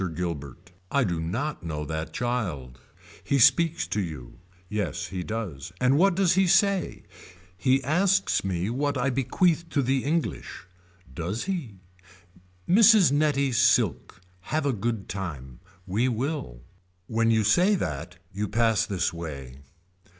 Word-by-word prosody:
Gilbert. 80 -2 -6 0.2
I 140 - +2
do 85 -7 -1
not 120 - -3
know 75 -3 -4
that 80 +1 -4
child. 85 - -3 0.4
He 140 - +1
speaks 165 +6 +4
to 105 - -1
you. 75 -8 -8 0.3
Yes 100 -5 -3
he 90 0 -4
does. 90 -8 -5
And 130 +2 +3
what 185 +4 +4
does 190 -2 +3
he 190 +1 +3
say. 200 +1 +2 0.5
He 130 +8 +1
asks 180 +8 +2
me 90 -1 -2
what 145 +3 -1
I 135 +2 0
bequeath 165 +6 +1
to 140 - 0
the 130 +1 0
English. 160 - -3 0.5
Does 90 +7 -3
he. 170 - -4 0.9
Mrs. 210 -3 +6
Nettie 145 -2 +1
Silk. 120 -8 +2 0.3
Have 155 -1 0
a 140 - +1
good 110 -1 -3
time. 75 -10 -6 0.3
We 110 +7 0
will. 125 - -4 0.4
When 115 +1 +1
you 110 -1 +3
say 180 - +4
that 80 - -4 0.2
you 105 +2 -2
pass 115 0 +1
this 95 -4 -1
way. 70 -6 -8
115 Hz, 140 wpm, -26 LUFS, 85-145 Hz, 0.9 s, Mrs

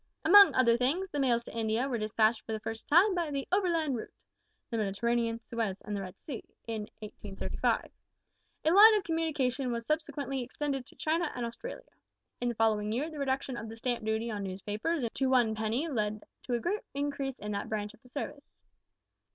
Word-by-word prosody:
"Among 400 +4 +9
other 235 -2 +5
things, 310 +10 0
the 290 - -2
mails 240 -3 +2
to - - -10
India 225 +3 0
were 245 -4 -1
despatched 215 +1 +2
for 220 - -5
the 220 - -2
first 225 0 -6
time 370 +7 +6
by 345 -3 -1
the 275 -2 -3
`overland 335 -8 +2
route' 225 - -5 0.6
the 230 - -1
Mediterranean, 230 +3 0
Suez, 220 -5 -2
and 210 - -4
the 200 - -2
Red 185 -2 -8
Sea 265 -7 -6 0.2
in 220 -2 -4
1835. 205 -2 -2 0.7
A 315 - +5
line 425 +4 +9
of 415 - +1
communication 285 -6 0
was 235 -1 -3
subsequently 285 -3 -2
extended 270 +1 -3
to - - -16
China 325 +1 0
and 245 - -2
Australia. 235 - -7 0.6
In 245 - 0
the 240 - -3
following 215 -1 +2
year 280 +8 -1
the 305 - -7
reduction 265 -1 -1
of 225 -2 -6
the 225 - -7
stamp 240 0 -2
duty 220 +2 -1
on 210 -1 -3
newspapers 210 - -2
to 265 -1 +1
one 245 -4 +4
penny 220 +8 -1
led 215 -7 -1 0.2
to 245 - +1
a - - 0
great 410 - -1
increase 280 -2 -2
in 210 - -5
that 200 - -3
branch 210 -1 -3
of 230 - -21
the 250 - -19
service. 285 +1 -6
245 Hz, 195 wpm, -31 LUFS, 220-290 Hz, 0.7 s, Among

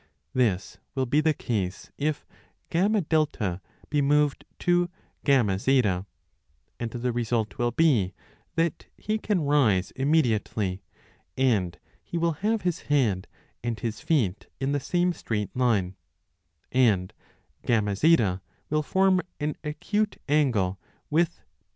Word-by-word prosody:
This 105 -7 0 0.2
will 130 -1 +1
be 145 +5 +2
the 160 +1 +3
case 100 -7 -3
if 150 0 -2 0.5
FA 185 +5 +3 1.0
be 145 -1 +2
moved 145 0 +2
to 175 0 +2 0.3
FZ, 110 -5 +2 0.7
and 120 - -2
the 120 +2 -2
result 115 -2 -1
will 120 0 +2
be 120 - +2 0.4
that 165 0 0
he 215 +1 -1
can 205 -5 0
rise 120 -11 +3
immediately, 115 - +1 0.6
and 100 -10 +2 0.2
he 170 - -5
will 170 0 +2
have 220 +1 +1
his 180 -3 0
head 115 -11 +2 0.4
and 120 -2 -2
his 115 -2 -3
feet 115 - 0
in 135 0 -1
858 - - +1
the 145 - +1
same 175 +6 +1
straight 105 - -3
line; 105 -8 +1 0.8
1 130 - +3 0.3
and - - -37 0.5
FZ 105 - +3 0.3
will 155 0 +2
form 190 +3 +3 0.2
an 150 0 -1
acute 205 +8 -1
angle 120 -11 +2 0.3
with 170 +2 +1 0.2
BF. - - -50
130 Hz, 125 wpm, -26 LUFS, 105-155 Hz, 1.0 s, the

